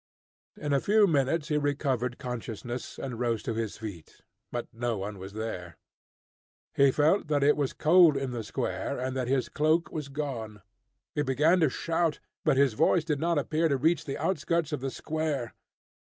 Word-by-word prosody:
In 145 -1 -2
a 140 - +4
few 210 0 +5
minutes 150 -1 +1
he 150 -1 +2
recovered 135 -4 -1
consciousness, 120 0 -5
and 125 -4 -5
rose 115 -3 0
to 115 - -2
his 110 -2 -3
feet, 100 -7 -9 0.3
but 120 - -3
no 115 -1 -2
one 100 +1 -5
was 95 +1 -8
there. 100 -6 -5 1.0
He 140 0 +5
felt 155 +7 +2
that 145 -2 +1
it 145 +1 +5
was 145 -3 -1
cold 165 -2 +5
in 135 -2 -2
the 120 -2 -4
square, - - -3
and 130 +1 -3
that 130 -2 -1
his 130 -2 +1
cloak 155 +3 +1
was 150 -3 -4
gone. 120 -8 -5 0.5
He 150 - 0
began 150 +6 +3
to 160 -4 +4
shout, 165 +2 -1 0.2
but 135 - +3
his 140 -3 +4
voice 160 +9 +3
did 150 -3 -1
not 170 +1 +1
appear 155 +3 +1
to 140 -3 +1
reach 160 +6 +2
the 135 - -4
outskirts 165 -1 0
of 150 - -2
the 135 - -2
square. 150 -5 -3
140 Hz, 185 wpm, -28 LUFS, 120-155 Hz, 1.0 s, few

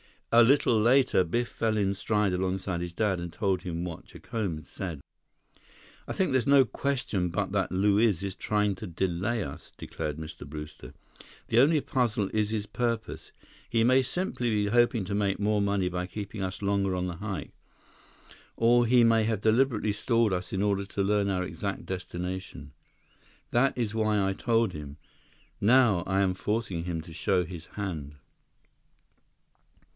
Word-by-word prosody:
A 120 - +8
little 125 -2 +4
later, 125 -4 +4
Biff 120 +8 -1
fell 110 -1 -1
in 100 -2 +1
stride 105 0 0
alongside 95 0 -2
his 85 -1 -5
dad 95 -1 0
and 85 -1 -5
told 95 -2 0
him 85 -1 -4
what 85 -3 -6
Jacome 110 -8 -4
had 75 - -11
said. 85 -7 -6 1.1
"I - - -3
think 185 -6 0
there's 130 -3 +1
no 140 -1 +7
question 125 -9 -1
but 95 +2 -2
that 100 -2 0
Luiz 100 0 +2
is 100 -1 -3
trying 105 0 0
to 105 +3 -7
delay 95 +6 -1
us," - - -9
declared 75 -1 -5
Mr. 80 0 -8
Brewster. 75 +1 -9 0.6
"The 115 - +4
only 150 +3 +5
puzzle 120 -8 0
is 105 -1 +1
his 110 -2 -2
purpose. 115 +1 -3 0.4
He 115 -1 +2
may 130 +3 +5
simply 130 -2 -2
be 105 -2 +1
hoping 120 0 +3
to 100 - -4
make 100 -1 +1
more 105 +1 +1
money 100 -2 +1
by 90 0 -3
keeping 100 +1 -6
us 95 +1 -4
longer 100 -1 +1
on 90 0 -1
the 85 -2 -5
hike. 100 0 -5 1.0
Or 120 +1 +4
he 120 0 +5
may 115 -1 +4
have 110 -2 -1
deliberately 110 -1 +2
stalled 115 0 +1
us 90 0 -4
in 95 +1 0
order 100 -1 0
to 100 0 -2
learn 100 0 +1
our 90 -2 0
exact - - -4
destination. 90 0 -6 0.8
That 125 +3 +2
is 115 -3 -1
why 110 -3 +1
I 95 - 0
told 115 0 +1
him. 75 -2 -8 0.6
Now, 115 -5 +4
I 95 +1 +2
am 95 -2 +2
forcing 100 -4 -2
him 85 -2 -3
to 80 +1 -12
show 90 +3 +1
his 85 -1 -8
hand." 80 -8 -5
100 Hz, 170 wpm, -28 LUFS, 90-115 Hz, 1.1 s, A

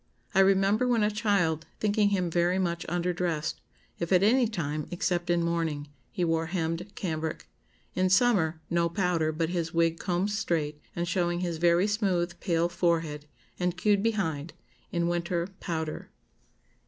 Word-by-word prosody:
I 190 - +3
remember, 195 +4 +4
when 235 -3 +3
a 210 - +2
child, 190 -7 +1
thinking 210 -1 +2
him 180 -4 0
very 175 +2 +2
much 170 -3 -1
under 175 +1 0
dressed, 165 -3 -2 0.4
if 170 +1 -3
at 185 0 +5
any 240 +3 +4
time, 155 -8 -3
except 175 0 -1
in 175 -1 +2
mourning, 165 -4 -1 0.2
he 180 - -1
wore 165 0 0
hemmed 165 +2 -2
cambric. 160 -3 -3 0.5
In 185 0 +1
summer, 185 -7 +3
no 170 0 +1
powder, 170 -3 +1
but 160 +1 -1
his 170 -2 -2
wig 165 0 +2
combed 185 +3 0
straight, 155 -7 -1
and 175 0 -2
showing 175 0 0
his 170 -2 -2
very 170 +2 +4
smooth, 190 -5 0
pale 170 -2 +1
forehead, 165 -4 -1 0.3
and 180 -1 0
queued 205 +1 +3
behind; 175 -9 -1 0.4
in 170 -1 0
winter, 175 +1 -1
powder." 160 -3 -4
175 Hz, 155 wpm, -28 LUFS, 165-190 Hz, 0.5 s, at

